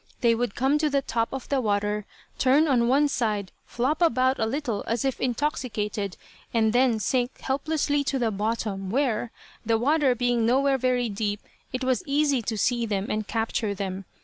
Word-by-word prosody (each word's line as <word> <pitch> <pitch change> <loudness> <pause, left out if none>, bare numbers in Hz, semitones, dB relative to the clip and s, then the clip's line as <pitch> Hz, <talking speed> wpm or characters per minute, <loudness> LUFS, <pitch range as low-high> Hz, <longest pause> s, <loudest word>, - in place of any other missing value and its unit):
They 235 -1 +4
would 235 -2 -2
come 270 +4 +2
to 305 0 +2
the 280 -1 +1
top 230 -2 -1
of 265 -1 -6
the 275 -2 +1
water, 210 -1 -1 0.3
turn 280 +5 +4
on 245 -4 +3
one 280 +4 +4
side, 215 -8 -1 0.2
flop 275 +8 -1
about 260 -4 +3
a 220 - +1
little 245 -4 -2
as 235 +3 -1
if 270 - -1
intoxicated, 225 - -2 0.3
and 220 -1 +2
then 245 -2 +3
sink 245 +4 -1
helplessly 285 +1 0
to 275 - 0
the 235 -3 0
bottom, 205 -2 -2
where, 245 -1 0 0.3
the 225 0 +2
water 275 +1 +2
being 245 -1 +1
nowhere 270 +3 +3
very 250 -1 +1
deep, 205 -1 -2 0.3
it 255 +1 -3
was 255 -1 +1
easy 285 -2 +2
to 220 0 -3
see 235 +2 +1
them 200 -2 -2
and 215 0 -2
capture 225 -2 -1
them. 190 0 -4
240 Hz, 180 wpm, -26 LUFS, 215-270 Hz, 0.3 s, They